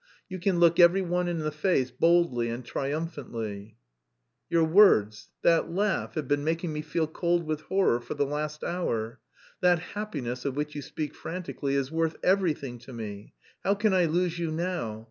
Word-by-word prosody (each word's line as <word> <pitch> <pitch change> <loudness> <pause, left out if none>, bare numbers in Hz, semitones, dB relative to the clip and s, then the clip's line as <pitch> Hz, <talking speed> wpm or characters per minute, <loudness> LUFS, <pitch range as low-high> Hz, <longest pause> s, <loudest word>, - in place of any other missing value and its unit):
You 185 -1 -6
can 180 0 +1
look 170 0 +5
every 175 +2 +6
one 180 0 0
in 175 -1 -1
the 155 -1 -2
face 150 -4 +1
boldly 130 -4 +2
and 120 +1 -5
triumphantly!" 120 -7 -4 0.7
"Your 165 -1 +3
words, 160 - +4
that 165 -1 +3
laugh, 200 +3 -1
have 155 -4 -3
been 145 +1 +1
making 165 +1 -1
me 150 - -3
feel 160 +2 -1
cold 170 +2 0
with 155 -1 -2
horror 190 -8 +2
for 120 - -6
the 145 0 +1
last 150 +1 -4
hour. 115 -11 -2 0.4
That 180 -1 +4
'happiness' 160 - -5
of 140 -2 -2
which 150 +1 -3
you 145 - -5
speak 150 +2 -5
frantically 165 -5 -4
is 135 0 -1
worth... 165 0 0
everything 155 -10 +1
to 120 +3 -13
me. 105 -3 -8 0.3
How 200 - +2
can 210 0 +2
I 180 -2 +4
lose 175 +1 0
you 170 -1 -1
now? 160 -10 -3
160 Hz, 180 wpm, -28 LUFS, 135-175 Hz, 0.7 s, every